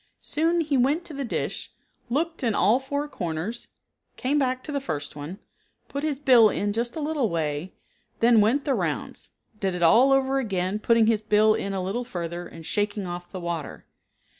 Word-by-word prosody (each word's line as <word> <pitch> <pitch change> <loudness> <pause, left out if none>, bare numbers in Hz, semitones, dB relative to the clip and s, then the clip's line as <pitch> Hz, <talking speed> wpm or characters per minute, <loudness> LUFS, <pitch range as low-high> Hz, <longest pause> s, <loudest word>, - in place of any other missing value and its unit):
Soon 330 +3 +1
he 295 -3 0
went 285 +7 +2
to 320 - -9
the 280 0 -3
dish, 235 - -3 0.4
looked 325 +6 -1
in 225 -4 +1
all 215 +8 +4
four 285 +2 -3
corners, 180 - -4 0.5
came 280 +4 +1
back 255 -1 0
to 305 - -6
the 280 -1 -1
first 145 - -4
one, 150 +6 -7 0.5
put 280 - -3
his 300 -3 0
bill 250 -6 +6
in 205 0 -1
just 235 +2 -2
a - - -3
little 295 -6 0
way, 160 +1 -3 0.4
then 230 -1 +5
went 245 +7 +2
the 280 - +2
rounds; - - -3 0.3
did 190 -2 -1
it 175 - -2
all 235 +11 +6
over 270 0 +3
again, 195 -4 -1
putting 230 0 +4
his 220 -1 +2
bill 215 0 +4
in 200 - -2
a 190 -1 -2
little 205 +7 -2
further, 175 -5 -5
and 165 -1 -11
shaking 205 +1 -1
off 175 0 -6
the 185 - -5
water. 170 -3 -5
225 Hz, 190 wpm, -25 LUFS, 185-275 Hz, 0.5 s, bill